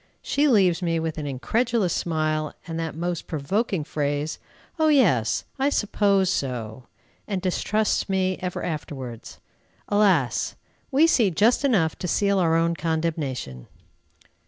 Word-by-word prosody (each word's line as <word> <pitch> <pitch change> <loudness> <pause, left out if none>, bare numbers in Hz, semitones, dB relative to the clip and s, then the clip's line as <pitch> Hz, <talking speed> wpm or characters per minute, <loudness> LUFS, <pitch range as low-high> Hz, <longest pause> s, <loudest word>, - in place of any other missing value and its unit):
She 290 +1 +2
leaves 190 - +3
me 165 -2 0
with 160 -1 -3
an 145 - -4
incredulous 215 - 0
smile, 155 -2 -1
and 165 -1 -5
that 160 -2 -4
most 175 +1 -3
provoking 180 +4 -1
phrase, 145 +1 -2 0.4
"O 315 - +4
yes! 175 - +3
I 275 +2 +3
suppose 200 -6 +2
so!" 125 - -4 0.4
and 195 -3 -2
distrusts 205 +4 0
me 185 -1 0
ever 180 -1 -4
afterwards. 135 -7 -6 0.5
Alas! 190 - +2 0.3
we 285 +3 +4
see 240 - +4
just 215 - +2
enough 195 - +2
to 180 - -3
seal 200 +2 +2
our 165 -2 +3
own 165 +1 +2
condemnation. 155 - -3
170 Hz, 135 wpm, -24 LUFS, 150-205 Hz, 0.5 s, O